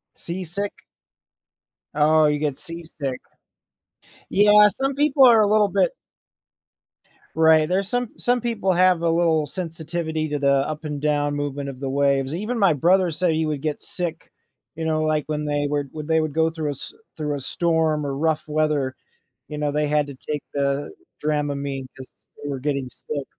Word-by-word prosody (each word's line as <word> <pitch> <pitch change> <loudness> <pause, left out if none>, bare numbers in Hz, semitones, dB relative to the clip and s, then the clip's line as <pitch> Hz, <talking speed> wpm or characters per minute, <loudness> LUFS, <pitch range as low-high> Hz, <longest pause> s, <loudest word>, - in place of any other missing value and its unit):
Seasick? 185 +3 -5 1.1
Oh, 155 +1 +4
you 150 0 +1
get 145 -3 -1
seasick. 165 -6 -5 1.1
Yeah, 210 +1 +6
some 270 +6 -2
people 280 -1 +4
are 235 -3 +7
a 210 - +4
little 210 0 +3
bit - - +1 1.4
Right, 160 -1 +5
there's 190 +1 0
some 245 0 -1
some 245 0 +1
people 220 -5 0
have 180 -1 +4
a 170 - +1
little 165 -2 +2
sensitivity 160 -1 -3
to 150 - -2
the 140 -1 +3 0.2
up 155 0 -5
and 150 -2 -4
down 145 -1 +1
movement 145 -1 -3
of 130 -1 -9
the 135 - -3
waves. 140 +1 +1
Even 225 +6 -3
my 195 -5 +4
brother 180 +5 +3
said 170 +2 0
he 160 0 0
would 150 -3 -2
get 155 -1 -3
sick, 170 -3 -4 0.4
you 165 - -5
know, 155 -1 +1
like, 155 -1 +1
when 150 0 -2
they 145 0 0
were 145 -1 -1
when 150 -1 -6
they 160 0 +3
would 155 -2 -2
go 160 +1 +2
through 160 -2 -4
a - - 0
s 140 - -5 0.2
through 150 -2 -2
a - - -4
storm, 160 +1 0
or 135 -1 -3
rough 155 0 -1
weather, 150 -3 0 0.5
you 150 - -6
know, 150 -1 -1
they 150 0 0
had 150 -1 +1
to 140 - -8
take 150 +2 -5
the 140 0 -1 0.3
Dramamine, 140 -3 -2
'cause 130 -1 -11 0.3
they 145 - -4
were 135 -2 -3
getting 140 -2 -2
sick. 140 +2 -5
155 Hz, 180 wpm, -23 LUFS, 145-175 Hz, 1.4 s, are